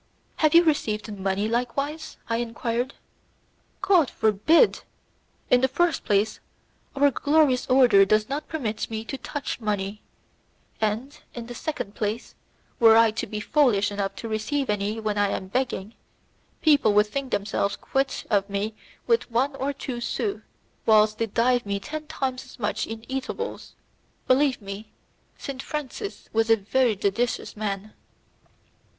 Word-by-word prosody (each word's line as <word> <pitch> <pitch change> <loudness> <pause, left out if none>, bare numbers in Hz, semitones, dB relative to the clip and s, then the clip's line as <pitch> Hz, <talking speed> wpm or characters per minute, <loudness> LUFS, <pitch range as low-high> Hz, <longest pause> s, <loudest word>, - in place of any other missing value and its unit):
"Have 310 0 +3
you 340 - +9
received 215 -9 -1
money 195 +1 -1
likewise?" 275 +7 -2
I 230 - 0
enquired. 235 +2 -2 0.9
"God 345 -9 +4
forbid! 220 - +3 0.7
In 245 - +6
the 265 - +4
first 335 +6 +1
place, 205 +1 +1 0.6
our 285 +1 +4
glorious 285 -2 +2
order 250 -6 +6
does 215 +2 +2
not 285 +3 -4
permit 225 -9 -3
me 220 0 -4
to 270 - -5
touch 285 +1 -4
money, 210 -2 -2 0.8
and, 220 +6 -2 0.2
in 240 -1 -6
the 240 - -8
second 240 -6 -4
place, 215 +2 -3 0.5
were 225 -2 +7
I 230 -1 +6
to 220 - -4
be 215 - -4
foolish 215 -5 +2
enough 200 -1 -3
to 230 - -6
receive 220 +4 -1
any 210 +2 -2
when 210 -2 -1
I 205 - +3
am 190 -1 -4
begging, 230 -3 -2 0.7
people 285 -9 +5
would 210 0 +6
think 270 +5 -4
themselves 200 -1 -1
quit 270 0 -2
of 200 -1 +2
me 200 +2 -2 0.3
with 465 - +2
one 255 +5 +1
or 275 +2 -1
two 260 -3 -6
sous, 400 - -2 0.5
whilst 215 -1 +5
they 230 - +1
give 245 +3 +2
me 200 -1 -2
ten 305 +7 -6
times 265 -4 -3
as 255 - -15
much 210 -4 -2
in 225 0 -7
eatables. 270 - -5 0.5
Believe 260 -3 +2
me 200 +2 -8 0.4
Saint 270 -1 -6
Francis, 300 - -6
was 225 +1 +2
a 225 - +7
very 225 +3 +1
judicious 200 +5 -1
man." 210 0 -4
230 Hz, 150 wpm, -25 LUFS, 210-275 Hz, 0.9 s, you